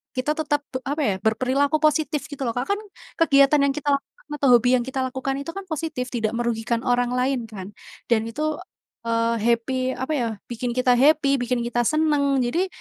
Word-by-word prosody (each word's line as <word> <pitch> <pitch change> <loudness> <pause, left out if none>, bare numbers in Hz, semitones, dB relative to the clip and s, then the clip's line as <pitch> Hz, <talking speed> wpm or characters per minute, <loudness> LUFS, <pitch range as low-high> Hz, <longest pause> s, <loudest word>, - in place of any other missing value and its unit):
kita 255 +3 0
tetap 295 -2 0
pe - - 0
apa 290 +3 -2
ya 200 - +1
berperilaku 260 +7 +1
positif 305 0 +1
gitu 285 -2 -9
loh 240 - 0
Kak, 245 - -1
kan - - -7 0.4
kegiatan 280 -2 +5
yang 280 - +3
kita 290 +1 -6
lakukan 275 - -7 0.3
atau 280 -2 0
hobi 245 - +1
yang 245 - 0
kita 265 +1 -4
lakukan 265 +1 -3
itu 280 +4 -5
kan 395 - -5
positif, 310 -4 -3
tidak 225 -3 -1
merugikan 235 -1 -1
orang 245 0 +1
lain 255 +1 +1
kan 195 -4 -8 0.4
dan 220 -2 +4
itu, 230 +6 -6 0.7
eee, 230 0 +1
happy 235 +2 +1 0.2
apa 260 +4 -4
ya, 235 - 0 0.2
bikin 240 0 -3
kita 255 0 +3
happy, 280 -1 +4
bikin 245 0 -1
kita 240 0 -2
seneng 310 -2 +2 0.2
jadi 335 +11 0
260 Hz, 190 wpm, -23 LUFS, 240-290 Hz, 0.7 s, kegiatan